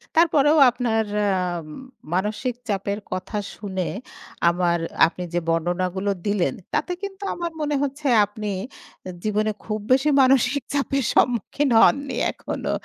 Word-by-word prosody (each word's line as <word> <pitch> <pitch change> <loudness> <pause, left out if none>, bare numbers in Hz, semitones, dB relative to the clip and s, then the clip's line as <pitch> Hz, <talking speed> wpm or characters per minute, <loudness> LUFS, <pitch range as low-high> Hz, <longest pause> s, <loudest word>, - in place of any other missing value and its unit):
তারপরেও 310 -2 +4
আপনার 235 -3 0 0.3
আম 175 -3 -2 0.5
মানসিক 215 +6 -1
চাপের 200 0 -2
কথা 185 +3 -4 0.2
শুনে, 190 -4 -4 0.6
আমার 170 -1 +1 0.3
আপনি 180 +2 -7
যে 175 - +2
বর্ণনাগুলো 180 +4 0
দিলেন, 205 -1 +1 0.2
তাতে - - 0
কিন্তু 400 0 -6
আমার 345 -1 -4
মনে 295 -1 0
হচ্ছে, 285 +1 -3 0.2
আপনি 210 +1 -6 0.7
জীবনে 215 0 +1
খুব 215 -1 -2
বেশি 270 +3 +4
মানসিক 260 +1 +3
চাপের 275 -1 0
সম্মুখীন 250 +4 +1
হননি 275 -1 +3 0.2
এখনো। - - -4
215 Hz, 120 wpm, -23 LUFS, 185-275 Hz, 0.7 s, তারপরেও